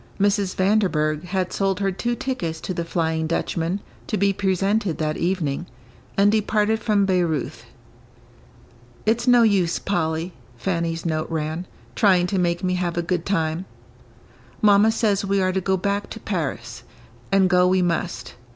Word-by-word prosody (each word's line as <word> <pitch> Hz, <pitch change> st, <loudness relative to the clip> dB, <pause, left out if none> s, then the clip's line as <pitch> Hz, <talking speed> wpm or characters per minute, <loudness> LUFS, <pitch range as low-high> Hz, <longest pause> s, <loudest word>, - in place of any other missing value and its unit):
Mrs. 200 Hz, -1 st, +1 dB
Vanderburgh 180 Hz, -6 st, +1 dB
had 185 Hz, 0 st, -2 dB
sold 195 Hz, -1 st, 0 dB
her 195 Hz, -1 st, +1 dB
two 240 Hz, +6 st, -2 dB
tickets 175 Hz, -12 st, -3 dB
to 185 Hz, -, -4 dB
the 170 Hz, -, -2 dB
"Flying 160 Hz, -1 st, -1 dB
Dutchman," 165 Hz, +3 st, -1 dB, 0.3 s
to 215 Hz, -, -1 dB
be 200 Hz, 0 st, +2 dB
presented 195 Hz, -1 st, 0 dB
that 155 Hz, -1 st, -1 dB
evening, 175 Hz, -3 st, -1 dB, 0.5 s
and 200 Hz, +1 st, +5 dB
departed 215 Hz, 0 st, +1 dB
from 210 Hz, -3 st, +2 dB
Bayreuth. 165 Hz, -11 st, -1 dB, 1.4 s
"It's 235 Hz, +3 st, +1 dB
no 245 Hz, -1 st, +6 dB
use, 195 Hz, -6 st, +2 dB
Polly," 165 Hz, -2 st, -2 dB, 0.2 s
Fanny's 165 Hz, +1 st, -2 dB
note 155 Hz, -1 st, -1 dB
ran, 160 Hz, +2 st, -3 dB, 0.3 s
"trying 185 Hz, -5 st, +4 dB
to 190 Hz, +1 st, -1 dB
make 175 Hz, 0 st, 0 dB
me 185 Hz, 0 st, +1 dB
have 175 Hz, -2 st, -2 dB
a 175 Hz, -, +1 dB
good 170 Hz, 0 st, -2 dB
time. 165 Hz, -2 st, -1 dB, 0.9 s
Mamma 210 Hz, +1 st, +5 dB
says 210 Hz, -3 st, +1 dB
we 200 Hz, 0 st, +1 dB
are 185 Hz, -1 st, +2 dB
to 190 Hz, +1 st, -1 dB
go 190 Hz, +1 st, +1 dB
back 200 Hz, +2 st, -2 dB
to 225 Hz, -, -7 dB
Paris; 135 Hz, -, -4 dB, 0.5 s
and 195 Hz, -1 st, +4 dB
go 180 Hz, 0 st, +4 dB
we 185 Hz, 0 st, +3 dB
must. 170 Hz, -6 st, -2 dB
185 Hz, 155 wpm, -23 LUFS, 165-200 Hz, 1.4 s, no